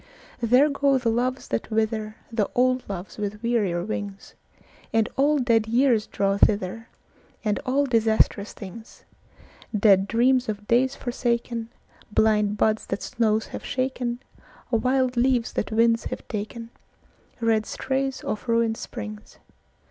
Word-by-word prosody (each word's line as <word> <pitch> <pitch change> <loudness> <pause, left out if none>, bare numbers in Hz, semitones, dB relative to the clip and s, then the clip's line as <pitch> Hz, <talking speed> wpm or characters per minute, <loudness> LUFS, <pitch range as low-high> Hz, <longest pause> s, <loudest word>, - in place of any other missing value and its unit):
There 250 +5 +5
go 280 -1 +2
the 240 -3 0
loves 250 +3 -1
that 115 - -2
wither, 220 -1 -1 0.2
The 220 -3 0
old 255 +1 +3
loves 195 +1 -6
with 210 +1 -4
wearier 205 -8 +1
wings; 200 -2 -6 0.6
And 225 0 +2
all 290 +2 +3
dead 230 -4 +2
years 235 -2 +3
draw 195 0 0
thither, 205 +2 +1 0.6
And 210 -2 +1
all 280 +3 +2
disastrous 220 -4 +2
things; 215 +3 -11 0.7
Dead 195 -2 +5
dreams 250 +2 +2
of 210 -1 -4
days 260 +3 +3
forsakenBlind 230 -3 -1
buds 215 +1 +1
that 195 - -3
snows 220 -2 +1
have - - -5
shaken, 250 -1 -2 0.5
Wild 255 +2 +1
leaves 245 -1 +2
that 210 - -2
winds 230 +1 +3
have - - -6
taken, 230 +2 -5 0.7
Red 225 -2 +1
strays 265 0 -2
of 215 +3 -4
ruined 230 -1 +2
springs. 215 -3 -8
230 Hz, 130 wpm, -25 LUFS, 215-250 Hz, 0.7 s, There